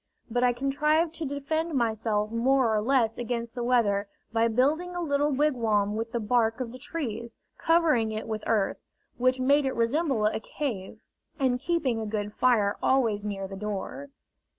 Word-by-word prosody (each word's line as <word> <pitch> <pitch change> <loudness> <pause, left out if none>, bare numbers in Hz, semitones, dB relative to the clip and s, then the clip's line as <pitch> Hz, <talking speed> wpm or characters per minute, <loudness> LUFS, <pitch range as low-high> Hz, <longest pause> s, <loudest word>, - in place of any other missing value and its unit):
But 245 +2 +1
I 250 - +5
contrived 300 +6 +1
to 325 -2 -4
defend 310 +3 -2
myself 220 -3 0
more 240 0 +2
or 210 - +1
less 230 -2 +1
against 235 -1 -3
the 240 - -4
weather 210 -5 +2 0.3
by 225 0 +3
building 300 +10 +1
a - - -2
little 290 -3 +1
wigwam 230 -8 +1
with 225 +1 -3
the 240 - -1
bark 225 +1 +1
of 245 -3 -4
the 255 - -10
trees, 235 -6 -5 0.2
covering 315 -10 +3
it 215 +1 -4
with 215 -1 -3
earth, 210 -4 +1 0.4
which 255 +1 +2
made 280 +2 +3
it 265 - -2
resemble 245 -1 +1
a 215 - +1
cave, 220 -6 -5 0.4
and 255 -2 +1
keeping 280 -6 0
a 220 - -4
good 210 -1 -3
fire 220 -6 +2
always 230 -6 +2
near 195 -2 -4
the 195 - -8
door. 210 +7 -5
240 Hz, 175 wpm, -27 LUFS, 220-275 Hz, 0.4 s, I